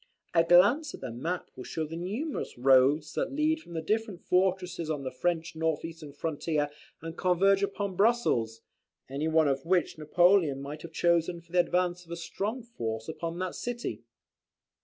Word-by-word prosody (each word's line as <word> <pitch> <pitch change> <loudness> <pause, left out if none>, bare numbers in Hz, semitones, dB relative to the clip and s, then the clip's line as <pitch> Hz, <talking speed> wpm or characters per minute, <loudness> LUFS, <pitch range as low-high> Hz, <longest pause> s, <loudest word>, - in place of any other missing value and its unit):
A 165 -1 +5
glance 205 - +5
at - - -15
the - - -5
map 165 +10 -4
will 130 - -8
show 160 +4 -3
the 160 +2 -7
numerous 210 - -4
roads 135 +4 +4
that - - -1
lead 310 +2 +2
from 175 - -13
the 160 -1 -3
different 215 0 -1
fortresses 180 -3 +1
on 150 -3 -2
the 130 - -3
French 165 +4 -1
north 160 -1 -1
eastern 160 -3 -8
frontier, 150 0 -2 0.3
and 165 0 -6
converge 190 +3 +3
upon 200 -1 -2
Brussels; 180 - +2 0.5
any 145 +3 -1
one 160 -1 +4
of 135 -1 0
which 175 -2 +1
Napoleon 170 -1 +3
might 145 +2 -7
have 170 - -9
chosen 170 +1 +1
for 170 0 -22
the 180 - +3
advance 180 0 +1
of 170 - -22
a 170 - -4
strong 210 +8 -4
force 115 - -5
upon 165 0 -4
that 185 0 -3
city. 240 0 -4
170 Hz, 180 wpm, -29 LUFS, 150-185 Hz, 0.5 s, A